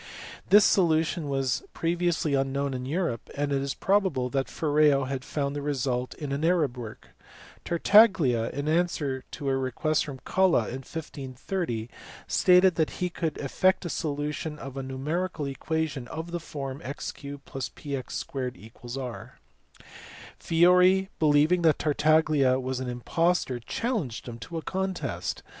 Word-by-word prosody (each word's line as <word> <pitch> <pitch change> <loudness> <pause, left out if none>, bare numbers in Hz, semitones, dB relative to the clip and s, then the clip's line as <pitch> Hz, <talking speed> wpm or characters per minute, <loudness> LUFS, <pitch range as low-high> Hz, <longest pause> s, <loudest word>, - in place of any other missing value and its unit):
This 205 0 +8
solu 165 -4 +4
tion 160 -2 -4
was 135 -1 0
previously 170 -2 0
unknown 135 0 0
in 130 0 -4
Europe, 160 - -2
and 145 0 -1
it 135 - +1
is 140 0 -3
probable 190 -11 +1
that 135 -1 0
Ferreo 150 -2 +3
had 135 -1 -3
found 140 0 -2
the 145 - -3
result 130 -3 -2
in 145 -3 -5
an 140 +2 -2
Arab 165 -7 +2
work. 115 -3 -9 0.6
Tartaglia, 170 - +4
in 145 +1 -4
answer 155 -5 0
to 145 - -6
a 135 - +2
request 135 +4 0
from 140 -3 -7
Colla 185 - +3
in 130 +2 -5
1530, 135 - -4 0.4
stated 180 0 +5
that 160 -2 +2
he 180 -1 -1
could 165 -2 -3
effect 185 +8 +1
the 175 - -3
solution 150 0 -3
of 135 -2 -8
a 135 - -3
numerical 150 +5 -3
equation 140 -1 -3
of 160 +4 -6
the 175 - -2
form 140 -4 -6
x 140 +3 -5
3 140 0 -8
+px*=r. 130 -2 -6 1.0
Fiori 180 +3 +4
believing 155 +3 +4
that 160 -3 +4
Tartaglia 150 -3 +3
was 130 0 -3
an 130 -1 -3
impostor 130 +2 0
challenged 160 - -3
him 120 -1 -7
to 165 +7 -6
a 160 - -4
contest. 175 - -3
145 Hz, 145 wpm, -27 LUFS, 130-170 Hz, 1.0 s, This